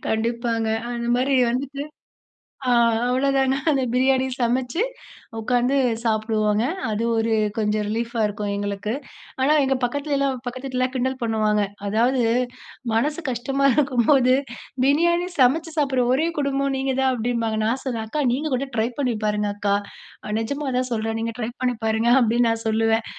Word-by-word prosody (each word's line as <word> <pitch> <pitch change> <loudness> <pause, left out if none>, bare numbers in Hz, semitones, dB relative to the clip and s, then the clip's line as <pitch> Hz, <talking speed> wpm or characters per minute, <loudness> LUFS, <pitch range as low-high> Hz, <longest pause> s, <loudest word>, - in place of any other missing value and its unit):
கண்டிப்பாங்க. 230 0 -1 0.2
அந்த 235 0 -3
மாரி 270 +2 +1 0.2
வந்துட்டு 275 +3 -3 0.9
ஆ - - +3 0.4
அவ்வளோதானா 270 +1 +2
அந்த 275 -3 +1
பிரியாணி 260 +1 +3
சமைச்சு 250 - 0 0.6
உட்காந்து 245 +3 +1 0.3
சாப்பிடுவாங்க. 215 -1 +1 0.3
அது 215 +1 -1 0.2
ஒரு 225 0 +1 0.3
கொஞ்சம் 210 0 0
ரிலீஃப்பா 230 +2 -2
இருக்கும், 205 0 -3
எங்களுக்கு. 205 +1 -3 0.5
ஆனா 270 +3 +3
எங்க 270 0 +1
பக்கத்திலயெல்லாம், 275 +1 0
பக்கத்து 255 +2 -5
வீட்ல 260 -1 -3
எல்லாம் 255 0 0
கிண்டல் 260 +1 -1
பண்ணுவாங்க. 215 -2 +1 0.2
அதாவது, 240 +5 +2 0.7
மனசு 295 +8 0
கஷ்டமா 270 +3 -1
இருக்கும்போது 255 -2 +3 0.5
பிரியாணி 340 +5 +3
சமைச்சு 310 +6 +3
சாப்பிடுற 265 -4 +2
ஒரே 310 +5 +1
குடும்பம் 275 -1 0
நீங்க 265 0 -1
தான் 265 0 +3
அப்டின்பாங்க. 230 -2 -1
நான் 245 +4 0
சொல்லுவேன், 230 -4 -3
"அக்கா 295 +5 -1
நீங்க 300 +5 -1
கூட 275 +2 -1
ட்ரை 220 +1 +2
பண்ணி 255 -4 0
பாருங்க 210 0 0
அக்கா, 205 -1 0 0.5
அ 210 - -4
நிஜமா 280 +5 -3
தான் 255 0 -1
சொல்றேன் 225 0 -1
நீங்க 230 0 -3
ட்ரை 235 -1 -2
பண்ணி 250 -1 +1
பாருங்க 225 +2 +2
அப்டின்னு 235 0 +3
நான் 225 0 -2
சொல்லுவேன்." 225 +1 +2
245 Hz, 150 wpm, -23 LUFS, 225-270 Hz, 0.9 s, ஆ